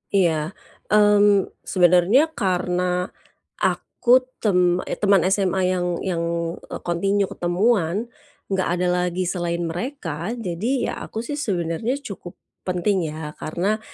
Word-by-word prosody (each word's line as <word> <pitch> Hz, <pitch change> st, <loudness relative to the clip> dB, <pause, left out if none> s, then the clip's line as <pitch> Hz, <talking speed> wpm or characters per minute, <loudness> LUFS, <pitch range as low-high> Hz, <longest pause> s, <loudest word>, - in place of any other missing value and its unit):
Iya, 165 Hz, -1 st, +1 dB, 0.3 s
mmm, 205 Hz, -1 st, +4 dB, 0.2 s
sebenarnya 185 Hz, -, +4 dB
karena 180 Hz, -, 0 dB, 0.8 s
aku 240 Hz, -, -1 dB, 0.3 s
tem 200 Hz, -5 st, +3 dB, 0.4 s
teman 200 Hz, -3 st, +4 dB
SMA 190 Hz, -2 st, 0 dB
yang 180 Hz, -1 st, 0 dB, 0.2 s
yang 175 Hz, -3 st, -1 dB, 0.4 s
eee, -, -, -8 dB
continue 195 Hz, +3 st, 0 dB
ketemuan, 190 Hz, +3 st, 0 dB, 0.4 s
enggak 190 Hz, -1 st, 0 dB
ada 180 Hz, 0 st, 0 dB, 0.2 s
lagi 180 Hz, +1 st, -2 dB
selain 175 Hz, -1 st, -2 dB
mereka, 175 Hz, -, -4 dB
jadi 190 Hz, -3 st, -4 dB, 0.2 s
ya -, -, -4 dB
aku 220 Hz, -, -7 dB
sih 290 Hz, +5 st, -5 dB
sebenarnya 190 Hz, -, -1 dB
cukup 195 Hz, -7 st, -8 dB, 0.3 s
penting 185 Hz, +2 st, +1 dB
ya, 150 Hz, 0 st, -6 dB
karena 195 Hz, +7 st, -1 dB
185 Hz, 115 wpm, -22 LUFS, 175-210 Hz, 0.8 s, mmm